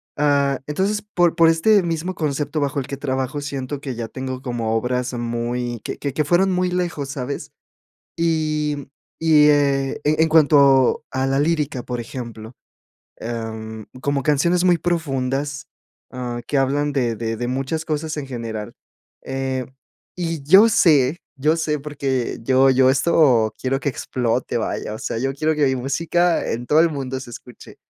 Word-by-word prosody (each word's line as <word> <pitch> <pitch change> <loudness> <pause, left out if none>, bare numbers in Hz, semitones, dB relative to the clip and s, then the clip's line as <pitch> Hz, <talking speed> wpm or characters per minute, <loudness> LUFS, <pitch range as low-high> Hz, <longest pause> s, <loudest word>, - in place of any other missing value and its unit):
ah, 140 -2 +2
entonces, 195 +7 0
por 175 -5 +1
por 165 -1 +6
este 195 +5 +4
mismo 170 +2 -2
concepto 150 -1 -2
bajo 140 0 -1
el 130 - -5
que 140 - -4
trabajo, 135 0 -3
siento 140 -1 -5
que 135 -3 -4
ya 115 -1 -4
tengo 130 0 -6
como 120 -4 -2
obras 125 +2 -2
muy 120 0 -3
que - - -5
que 140 -3 -4
que 150 - +1
fueron 175 +5 +3
muy 180 0 0
lejos, 175 -6 -2
¿sabes?, 140 -1 -5 0.7
y 155 -4 -1 0.3
y, 150 -2 +6
eh, 140 -2 +1
e 155 +2 +2
en 160 - +3
cuanto 140 -4 +5
a 130 0 -1
la 135 +1 +1
lírica, 150 -4 0
por 125 -1 -4
ejemplo, 115 -2 -8 0.6
em, 110 -1 -6 0.2
como 140 -1 -1
canciones 170 +5 +2
muy 175 -2 +4
profundas, 145 -4 -2 0.4
ah, 120 -1 -5
que 145 - 0
hablan 145 +2 +1
de 125 -5 0
de 115 0 -3
de 120 +1 -3
muchas 135 +5 -2
cosas 155 0 -3
en 145 - -4
general, 115 -4 -6 0.5
eh, 130 -1 -3 0.5
y 165 -4 -3
yo 195 +10 +7
sé, 155 - +4 0.2
yo 155 +4 +2
sé, 150 -2 -1
porque 135 -4 -3
yo 130 +2 +4
yo 130 0 +4
esto 135 -6 +3
quiero 135 +1 -1
que 145 - 0
explote, 125 -1 -2
vaya, 110 - -3
o - - -9
sea, - - -3
yo 135 +1 -1
quiero 155 +3 0
que 150 -1 +2
mi 130 - +1
música 165 +6 0
en 120 +2 -3
todo 150 +5 +3
el 170 - +5
mundo 135 -3 -4
se 125 - -10
escuche, 120 +1 -12
140 Hz, 170 wpm, -21 LUFS, 125-155 Hz, 0.7 s, yo